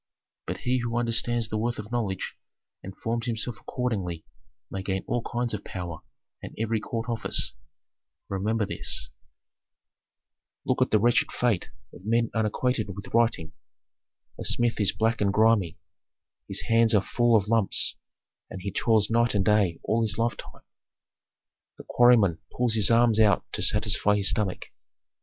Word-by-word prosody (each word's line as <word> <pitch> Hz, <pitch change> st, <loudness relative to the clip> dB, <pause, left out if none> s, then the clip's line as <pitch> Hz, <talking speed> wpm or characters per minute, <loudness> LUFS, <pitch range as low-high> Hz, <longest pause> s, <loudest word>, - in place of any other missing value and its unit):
But -, -, -5 dB
he 125 Hz, +1 st, 0 dB
who 120 Hz, 0 st, -2 dB
understands 120 Hz, -1 st, +1 dB
the 110 Hz, -, -2 dB
worth 120 Hz, +2 st, -1 dB
of 105 Hz, +1 st, -8 dB
knowledge 110 Hz, -6 st, -3 dB, 0.5 s
and 95 Hz, 0 st, -10 dB
forms 115 Hz, +1 st, -3 dB
himself 115 Hz, 0 st, -3 dB
accordingly 95 Hz, -10 st, -3 dB, 0.5 s
may 95 Hz, -, -4 dB
gain 95 Hz, 0 st, -3 dB
all 120 Hz, -, -1 dB
kinds 120 Hz, 0 st, -2 dB
of 105 Hz, -, -4 dB
power 85 Hz, -3 st, -6 dB, 0.4 s
and -, -, -9 dB
every 115 Hz, 0 st, -1 dB
court 115 Hz, +2 st, -5 dB
office. 115 Hz, -2 st, -1 dB, 0.7 s
Remember 105 Hz, +3 st, -1 dB
this. -, -, -3 dB
Authentic. -, -, -50 dB
"Look -, -, 0 dB
at -, -, +3 dB
the 110 Hz, -, +4 dB
wretched 120 Hz, +3 st, +2 dB
fate 120 Hz, -7 st, 0 dB, 0.2 s
of -, -, -13 dB
men 115 Hz, +2 st, +1 dB
unacquainted 110 Hz, +2 st, 0 dB
with 100 Hz, -, -10 dB
writing. 115 Hz, -9 st, +1 dB, 0.9 s
A -, -, -4 dB
smith 120 Hz, -1 st, +1 dB
is 105 Hz, -, +3 dB
black 110 Hz, +2 st, 0 dB
and 100 Hz, -1 st, +2 dB
grimy, 105 Hz, -5 st, +2 dB, 0.7 s
his -, -, -3 dB
hands 115 Hz, 0 st, +3 dB
are 100 Hz, -, +3 dB
full 120 Hz, +1 st, +2 dB
of 105 Hz, -2 st, +2 dB
lumps, 110 Hz, -3 st, +2 dB, 0.5 s
and 95 Hz, -, -7 dB
he 100 Hz, -, -3 dB
toils 110 Hz, 0 st, +2 dB
night 115 Hz, 0 st, +2 dB
and 95 Hz, -2 st, +1 dB
day 100 Hz, -5 st, +2 dB
all 115 Hz, +1 st, +1 dB
his 105 Hz, -3 st, -1 dB
lifetime. 115 Hz, +1 st, -3 dB, 1.1 s
The -, -, -10 dB
quarryman 115 Hz, -9 st, +4 dB
pulls 125 Hz, -2 st, 0 dB
his 110 Hz, -3 st, +4 dB
arms 115 Hz, -1 st, +4 dB
out 105 Hz, -2 st, +4 dB
to -, -, -3 dB
satisfy 105 Hz, -1 st, +2 dB
his 100 Hz, -2 st, +3 dB
stomach. 95 Hz, -2 st, -3 dB
110 Hz, 155 wpm, -26 LUFS, 100-115 Hz, 1.1 s, the